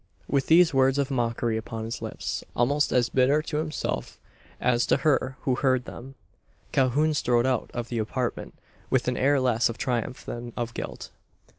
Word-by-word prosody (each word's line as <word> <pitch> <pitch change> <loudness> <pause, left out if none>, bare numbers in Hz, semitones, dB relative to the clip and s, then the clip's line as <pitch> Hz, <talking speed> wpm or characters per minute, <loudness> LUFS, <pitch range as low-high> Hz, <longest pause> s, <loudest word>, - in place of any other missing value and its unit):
With 140 -1 0
these 165 0 +6
words 135 0 +3
of 140 0 0
mockery 115 -2 0
upon 110 0 -5
his 115 - -5
lips - - -4
almost 145 +5 +2
as 125 -2 +3
bitter 135 +5 +3
to 150 0 -3
himself 155 0 -3 0.4
as 120 -1 +2
to - - +3
her 130 -3 +2
who 130 - +1
heard 130 -3 +1
them 135 +3 -10 0.6
Calhoun 140 +4 +2
strode 120 -4 +2
out 130 -1 0
of 120 -1 -4
the 120 - -2
apartment, 120 +3 -3 0.3
with 130 -2 +1
an 125 - +1
air 140 +2 +3
less 120 -3 +2
of 115 - -5
triumph 125 0 -2
than 120 0 -6
of 120 -1 -3
guilt. - - -6
130 Hz, 175 wpm, -26 LUFS, 120-140 Hz, 0.6 s, these